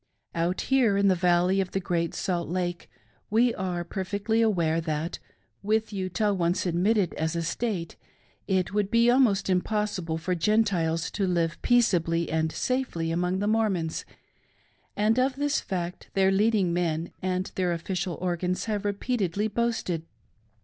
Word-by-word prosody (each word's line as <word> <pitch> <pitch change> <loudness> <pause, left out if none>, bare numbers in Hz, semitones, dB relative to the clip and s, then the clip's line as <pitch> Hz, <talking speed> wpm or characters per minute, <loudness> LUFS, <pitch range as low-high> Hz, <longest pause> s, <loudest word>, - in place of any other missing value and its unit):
Out 170 +2 0
here 250 -7 +3
in 200 0 +4
the - - +5
Valley 180 +2 +3
of 185 - -5
the 195 - +1
Great 170 -2 -1
Salt 175 -3 -2
Lake 175 0 -3 0.4
we 230 +3 +3
are 180 -2 -3
perfectly 200 +5 -2
well 225 - +4
aware 165 -4 +1
that, 160 +1 -3 0.4
with 220 +1 0
Utah 200 +2 0
once 175 0 0
admitted 185 +2 +1
as 160 +1 -2
a 170 - -1
State, 175 0 -3 0.5
it 190 0 0
would 205 -1 +1
be 235 +1 +4
almost 235 -6 +3
impossible 185 -3 -1
for 175 +3 -2
Gentiles 175 -3 +1
to 195 -2 -1
live 170 -2 0
peaceably 170 -9 +2
and 160 0 0
safely 250 -12 -1
among 180 +2 0
the 205 +2 -1
Mormons; 205 -7 0 0.9
and 220 +4 +2
of 260 +1 +2
this 290 +1 0
fact 180 -2 -5
their 190 0 +4
leading 200 -3 +2
men 170 -1 -1
and 185 0 -2
their 180 -2 0
official 175 +1 -2
organs 180 0 -1
have 210 -2 -2
repeatedly 205 -1 -1
boasted. 210 -7 -2
185 Hz, 150 wpm, -27 LUFS, 170-210 Hz, 0.9 s, the